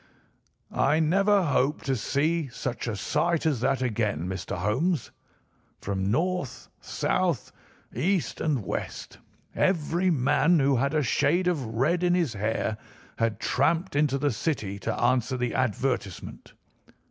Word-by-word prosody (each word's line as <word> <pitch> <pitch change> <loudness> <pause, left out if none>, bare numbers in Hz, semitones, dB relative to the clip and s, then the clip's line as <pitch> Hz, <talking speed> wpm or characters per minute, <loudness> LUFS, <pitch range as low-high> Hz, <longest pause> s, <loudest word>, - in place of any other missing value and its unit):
"I 155 - +2
never 195 +5 +3
hope 145 -2 +1
to 135 -4 0
see 155 +6 0
such 125 -1 -4
a 115 - -2
sight 160 +10 0
as 150 -6 +1
that 130 +2 +1
again, 105 -8 -1
Mr. 95 0 -4
Holmes. 125 - 0 0.7
From 95 -1 -2
north, 145 - -1
south, - - -1 0.4
east, 185 -3 0
and 140 -10 0
west - - -5 0.4
every 175 0 +1
man 160 +3 +3
who 140 -2 +3
had 140 +5 0
a 155 - +2
shade 150 +8 +2
of 165 -7 +1
red 135 +10 0
in 175 0 +3
his 165 -9 0
hair 110 +1 -2 0.4
had 115 -2 0
tramped 170 0 +1
into 145 -2 +2
the 145 +1 +1
city 105 -5 -2
to - - -3
answer 125 +1 +1
the 125 -1 -1
advertisement. 125 -5 -2
135 Hz, 135 wpm, -27 LUFS, 115-165 Hz, 0.7 s, never